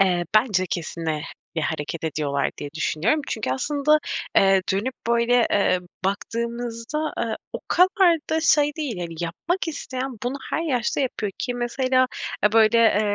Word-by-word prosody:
Eee, 180 Hz, -3 st, +3 dB
bence 215 Hz, -5 st, +3 dB
kesin, 165 Hz, -1 st, -4 dB
eee, 155 Hz, -1 st, -1 dB, 0.3 s
bir 165 Hz, -, 0 dB
hareket 160 Hz, +2 st, -3 dB
ediyorlar 145 Hz, -3 st, -1 dB
diye 145 Hz, -, -6 dB
düşünüyorum. 175 Hz, -, +1 dB
Çünkü 220 Hz, -, -2 dB
aslında, 295 Hz, +3 st, +2 dB, 0.4 s
eee, 195 Hz, -1 st, +5 dB
dönüp 220 Hz, +7 st, -1 dB
böyle, 235 Hz, 0 st, +3 dB
eee, 200 Hz, -2 st, +3 dB, 0.3 s
baktığımızda, 235 Hz, +7 st, -3 dB
eee, 225 Hz, -2 st, -1 dB, 0.2 s
o -, -, -4 dB
kadar 365 Hz, -1 st, +5 dB
da 320 Hz, 0 st, +2 dB
şey 295 Hz, -2 st, +4 dB
değil. 280 Hz, -, -3 dB
Hani, 170 Hz, -1 st, -5 dB
yapmak 325 Hz, -, -2 dB
isteyen 265 Hz, -3 st, -4 dB
bunu 250 Hz, +3 st, -2 dB
her 325 Hz, -, 0 dB
yaşta 255 Hz, -5 st, 0 dB
yapıyor 220 Hz, -6 st, -2 dB
ki 245 Hz, -, -2 dB
mesela 255 Hz, +1 st, +1 dB, 0.4 s
ya 210 Hz, -, +4 dB
böyle 225 Hz, -1 st, +5 dB
230 Hz, 150 wpm, -23 LUFS, 185-270 Hz, 0.4 s, eee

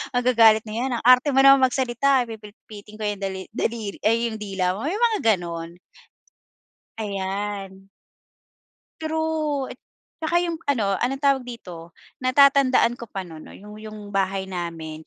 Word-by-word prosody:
magagalit 230 Hz, -3 st, +5 dB
na 215 Hz, -, -6 dB
yan, 255 Hz, +3 st, -2 dB
"Ang -, -, -13 dB
arte 255 Hz, +4 st, +5 dB
mo 270 Hz, -, +3 dB
naman 275 Hz, -1 st, +7 dB
magsalita 260 Hz, +1 st, +1 dB
pipilipitin 210 Hz, -1 st, -12 dB
ko -, -, -5 dB
'yong 205 Hz, -1 st, -2 dB
dali 190 Hz, -1 st, -4 dB
dalir, 220 Hz, -2 st, -3 dB
ay 230 Hz, +2 st, +2 dB
'yong 220 Hz, -, -7 dB
dila 190 Hz, -3 st, -2 dB
mo." -, -, -6 dB
Iyong 415 Hz, +8 st, +1 dB
mga 425 Hz, -, -1 dB, 0.2 s
ganon. 170 Hz, -1 st, -7 dB, 1.2 s
Ayan. 195 Hz, -1 st, -5 dB, 1.1 s
True 315 Hz, -3 st, -2 dB
at -, -, -24 dB, 0.4 s
saka 315 Hz, +2 st, -1 dB
iyong 345 Hz, -1 st, -2 dB, 0.2 s
ano, 205 Hz, -7 st, 0 dB
anong 265 Hz, +2 st, -1 dB
tawag 275 Hz, -2 st, +2 dB
dito? 180 Hz, -9 st, -10 dB, 0.3 s
Natatandaan 260 Hz, -2 st, +4 dB
ko 235 Hz, -2 st, -10 dB
pa 195 Hz, -1 st, -5 dB
noon 160 Hz, -2 st, -11 dB
'no -, -, -13 dB
iyong 210 Hz, +1 st, -12 dB
iyong 215 Hz, 0 st, -9 dB
bahay 195 Hz, 0 st, 0 dB
namin 165 Hz, -4 st, -6 dB
220 Hz, 150 wpm, -23 LUFS, 195-260 Hz, 1.2 s, naman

